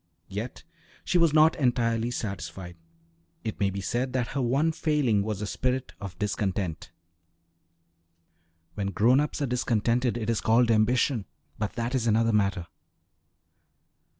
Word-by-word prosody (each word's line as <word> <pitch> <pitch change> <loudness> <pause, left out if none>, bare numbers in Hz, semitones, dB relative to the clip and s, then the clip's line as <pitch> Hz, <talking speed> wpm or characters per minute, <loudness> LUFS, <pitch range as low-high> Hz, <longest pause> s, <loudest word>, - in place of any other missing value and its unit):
Yet 105 +6 -6 0.4
she 180 - +2
was 165 -2 +4
not 155 +1 +5
entirely 120 -3 +1
satisfied; 90 -6 -5 0.7
it 110 -2 -4
may 100 - +2
be 100 0 -4
said 125 +6 -2
that 125 -2 -1
her 140 - -2
one 135 +7 +2
failing 150 -10 +1
was 105 0 -3
a - - -1
spirit 125 +6 -2
of 95 -3 -7
discontent. 95 -4 -2 1.8
When 100 -2 -3
grown 115 +7 +3
ups 150 0 -1
are - - +2
discontented, 120 -1 0
it 110 -2 -4
is 115 -2 0
called 115 +1 +3
ambition; 115 +1 +2 0.3
but 105 -2 -2
that 120 +2 -3
is 120 -3 0
another 115 +1 +3
matter. 100 -4 +1
115 Hz, 140 wpm, -27 LUFS, 100-125 Hz, 1.8 s, not